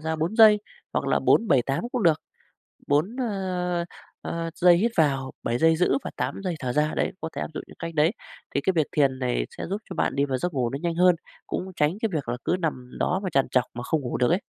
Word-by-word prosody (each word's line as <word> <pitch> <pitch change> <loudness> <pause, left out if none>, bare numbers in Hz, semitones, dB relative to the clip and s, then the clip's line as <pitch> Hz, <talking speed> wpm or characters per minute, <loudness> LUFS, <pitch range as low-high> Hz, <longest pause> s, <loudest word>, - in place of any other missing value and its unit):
ra 160 +1 -2
4 170 +8 -2
giây. 215 -2 +8 0.3
Hoặc - - -1
là - - +3
4-7-8 140 - +2
cũng 245 -4 0
được, 160 -3 +4 0.7
4, 160 - +1
ơ, 185 -6 -1 0.4
ơ, 165 0 -3
giây 175 -1 +6
hít 230 +6 +1
vào, 135 -4 +2
7 120 +1 -1
giây 160 +2 +4
giữ 160 -5 +2
và - - -4
8 130 +8 -3
giây 180 -3 -1
thở 125 -3 -2
ra 150 +2 +1
đấy, - - 0
có 160 - -3
thể - - -2
áp - - -3
dụng - - -4
những - - -15
cách 165 0 -5
đấy. 155 +3 +4 0.4
Thì 140 - +2
cái 190 - +1
việc 155 -3 +3
thiền 135 -3 +2
này 125 -2 -1
sẽ - - -4
giúp 200 +4 -3
cho - - -4
bạn - - 0
đi 140 - +3
vào 130 -2 -1
giấc 175 +6 -2
ngủ 125 -3 0
nó 135 - -3
nhanh 170 -1 0
hơn, 180 +1 +5 0.3
cũng 190 +1 -4
tránh 150 +7 +1
cái 225 - +2
việc 145 -6 -2
là 120 - -1
cứ 180 - +1
nằm 130 -6 -3
đó 180 +2 +1
và 185 - -2
trằn 135 -1 +2
trọc 125 -1 +2
mà 120 - -5
không 155 +5 0
ngủ 125 -3 -3
được 125 +4 +2
ấy. 180 +4 +2
160 Hz, 255 wpm, -25 LUFS, 135-180 Hz, 0.7 s, giây